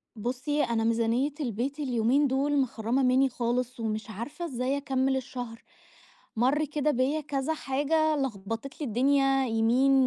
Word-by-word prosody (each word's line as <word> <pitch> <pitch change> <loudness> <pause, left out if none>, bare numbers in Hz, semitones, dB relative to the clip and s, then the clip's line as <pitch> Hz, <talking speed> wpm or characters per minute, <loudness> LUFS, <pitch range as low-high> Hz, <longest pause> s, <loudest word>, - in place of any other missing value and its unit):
بُصّي 260 +7 -1
أنا 230 -1 0
ميزانية 230 +5 +1
البيت 265 +2 -2
اليومين 260 +1 +2
دول 280 +2 +1
مخرّمة 240 +1 0
مني 260 +1 +4
خالص، 245 0 -2
ومش 220 -1 -3
عارفة 260 - -6
إزاي 260 -2 -1
أكمل 265 -1 0
الشهر. 245 -3 -6 0.7
مَرّ 265 +7 +2
كده 300 0 0
بيّا 275 +4 +1
كذا 290 +1 -2
حاجة 305 +2 +1
لخبطِت 225 0 -4
لي 295 - -1
الدنيا 270 +3 +3
يمين 235 +4 +3
260 Hz, 135 wpm, -28 LUFS, 235-285 Hz, 0.7 s, مني